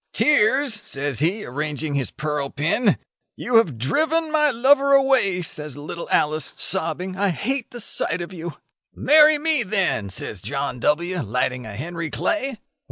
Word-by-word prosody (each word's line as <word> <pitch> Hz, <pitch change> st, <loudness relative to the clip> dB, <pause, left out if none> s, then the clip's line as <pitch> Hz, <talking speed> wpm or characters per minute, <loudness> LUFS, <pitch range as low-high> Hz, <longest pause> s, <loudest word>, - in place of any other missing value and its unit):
tears?' 265 Hz, -4 st, +3 dB
says 140 Hz, -2 st, -3 dB
he, 185 Hz, +8 st, 0 dB
arranging 150 Hz, +3 st, -3 dB
his 140 Hz, -3 st, 0 dB
pearl 150 Hz, -2 st, -3 dB
pin. 165 Hz, -, +1 dB, 0.4 s
'You 240 Hz, -1 st, +2 dB
have 165 Hz, -, +2 dB
driven 315 Hz, -, 0 dB
my 300 Hz, -1 st, +3 dB
lover 275 Hz, +3 st, +3 dB
away,' 265 Hz, -10 st, +3 dB
says 150 Hz, -3 st, -2 dB
little 155 Hz, +4 st, -7 dB
Alice, 155 Hz, -1 st, 0 dB
sobbing: 185 Hz, 0 st, -1 dB
'I 200 Hz, +1 st, +1 dB
hate 245 Hz, -, -2 dB
the 240 Hz, -, -9 dB
sight 170 Hz, -5 st, +1 dB
of 175 Hz, +2 st, -7 dB
you.' 170 Hz, -2 st, -7 dB, 0.4 s
'Marry 305 Hz, 0 st, +5 dB
me, 305 Hz, -2 st, +1 dB
then,' 190 Hz, -, -1 dB
says 95 Hz, 0 st, -5 dB
John 140 Hz, 0 st, -4 dB
W., 170 Hz, +7 st, 0 dB
lighting 125 Hz, +1 st, -2 dB
a 105 Hz, -, -8 dB
Henry 165 Hz, +6 st, -5 dB
Clay. 275 Hz, -, -2 dB
180 Hz, 155 wpm, -22 LUFS, -, 0.4 s, Marry